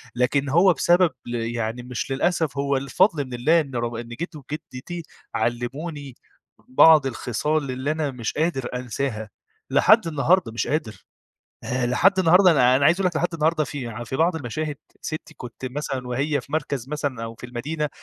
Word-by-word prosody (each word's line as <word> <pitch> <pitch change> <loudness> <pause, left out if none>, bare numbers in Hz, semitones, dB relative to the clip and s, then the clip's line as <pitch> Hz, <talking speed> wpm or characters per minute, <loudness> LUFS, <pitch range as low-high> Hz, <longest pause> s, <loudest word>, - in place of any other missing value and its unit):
لكن 135 +3 +1
هو 175 +5 +5
بسبب 175 +1 +4 0.2
ال 120 - -3 0.2
يعني 115 +2 -3
مش 125 +1 -5
للأسف 155 0 0
هو 140 -1 +1
الفضل 140 - +2
من 130 - -10
الله 155 +8 +3
إن 135 -4 -8
رغ 120 -1 -2
إن 120 - -12
جد 160 +8 -6
وجدتي 150 +3 -7 0.3
علموني 135 +3 -3 0.5
بعض 150 +2 +6
الخصال 140 +4 -1
اللي 130 +4 -2
أنا 155 -2 -1
مش 120 -3 -4
قادر 155 -5 -1
أنساها، 120 -3 -3 0.4
لحد 215 -5 +5
النهارده 160 -2 +2
مش 115 - -2
قادر. 145 -8 -3 0.6
آآ، 125 0 -1
لحد 190 +10 +3
النهارده 180 +1 +6
أنا 125 -4 +5
أنا 140 - +2
عايز 165 +3 +5
أقول 185 - +2
لك 175 - -4
لحد 175 +1 -1
النهارده 160 0 +1
في 120 -5 -6
في 130 - -4
بعض 165 +1 +2
المشاهد 150 +2 -4 0.3
ستي 155 +1 -6
كنت 125 +1 -8
مثلًا 130 -1 -4
وهي 140 +3 0
في 140 - -18
مركز 140 -4 -2
مثلًا 145 -6 -3
أو 115 0 -6
في 125 - -9
المدينة، 145 +5 -3
140 Hz, 175 wpm, -23 LUFS, 125-160 Hz, 0.6 s, بعض